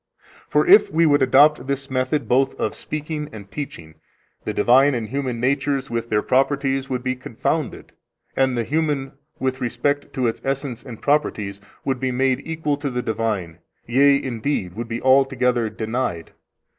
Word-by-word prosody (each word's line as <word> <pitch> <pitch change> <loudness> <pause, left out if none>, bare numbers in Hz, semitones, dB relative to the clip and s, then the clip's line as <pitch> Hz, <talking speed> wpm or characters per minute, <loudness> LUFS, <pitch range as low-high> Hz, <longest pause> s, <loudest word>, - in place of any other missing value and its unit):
For - - +3
if 395 +3 +7
we 165 +1 +3
would 145 -2 +4
adopt 140 +3 +5
this 140 0 -2
method 130 +3 0
both 135 +2 +1
of 110 - -1
speaking 150 0 -5
and 100 -2 -11
teaching, 85 - -7 0.5
the - - -1
divine 135 +3 +4
and 115 -2 -3
human 130 -1 -3
natures 135 +1 0
with 115 0 -3
their 105 -1 +1
properties 135 0 +1
would 125 -1 -2
be 130 0 -1
confounded, 125 - -3 0.4
and 130 -2 +2
the 120 - +1
human, 145 -1 -1 0.3
with 130 0 -2
respect 130 +4 -1
to 130 -3 -1
its 115 - -1
essence 135 -3 -3
and 120 -5 -9
properties, 105 -9 0 0.2
would 135 -2 -1
be 130 0 -1
made 130 0 +1
equal 160 -3 -2
to 145 -1 -3
the 125 -1 -3
divine, 105 -7 -2 0.3
yea, 140 +4 +4
indeed, 120 -7 -2
would 115 +1 -5
be 115 +1 -5
altogether 130 -3 +3
denied. 110 -5 -3
130 Hz, 165 wpm, -22 LUFS, 120-140 Hz, 0.5 s, if